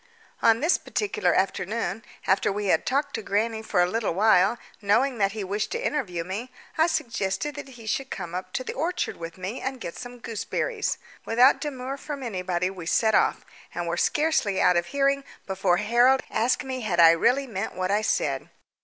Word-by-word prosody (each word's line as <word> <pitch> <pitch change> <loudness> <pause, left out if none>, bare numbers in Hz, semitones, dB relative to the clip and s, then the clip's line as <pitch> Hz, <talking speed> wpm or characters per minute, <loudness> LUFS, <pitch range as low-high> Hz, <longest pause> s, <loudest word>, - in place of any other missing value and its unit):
On 225 0 +4
this 325 +4 +3
particular 425 0 0
afternoon, 210 +4 -1 0.2
after 190 +1 +2
we 205 0 -2
had 160 - 0
talked 280 +2 0
to - - -3
grannie 220 +2 -1
for 180 -5 +2
a - - +2
little 215 -3 -1
while, 205 +1 +4 0.2
knowing 235 +5 +2
that 195 -1 +2
he 215 -2 -4
wished 205 +3 -2
to 470 +1 -3
interview 185 - -1
me, 200 +8 -5 0.3
I 320 +1 +4
suggested 295 - -1
that 285 -1 -8
he 230 - -12
should 265 +5 -2
come 175 -3 -6
up 185 +1 -5
the 255 - -3
orchard 330 +6 -2
with 165 +1 -7
me 190 +6 -5
and 265 -1 -3
get 170 - -6
some 245 0 -8
gooseberries. 245 - -2 0.3
Without 245 +4 +4
demur 270 -2 -4
from 280 -1 -6
anybody 185 -4 -1
we 180 -4 -8
set 220 +4 +3
off, - - +2 0.3
and 175 0 -2
were 170 - 0
scarcely 295 - +1
out 180 - +4
of 175 0 +1
hearing 275 0 +1 0.2
before 190 -2 +1
Harold 240 +6 +4
asked 240 +3 +1
me 260 -1 -4
had 190 -6 -1
I 165 -1 +9
really 245 +11 +2
meant 220 -4 -4
what 185 +1 -1
I 205 +1 +2
said. 140 -10 -1
220 Hz, 190 wpm, -26 LUFS, 190-265 Hz, 0.3 s, I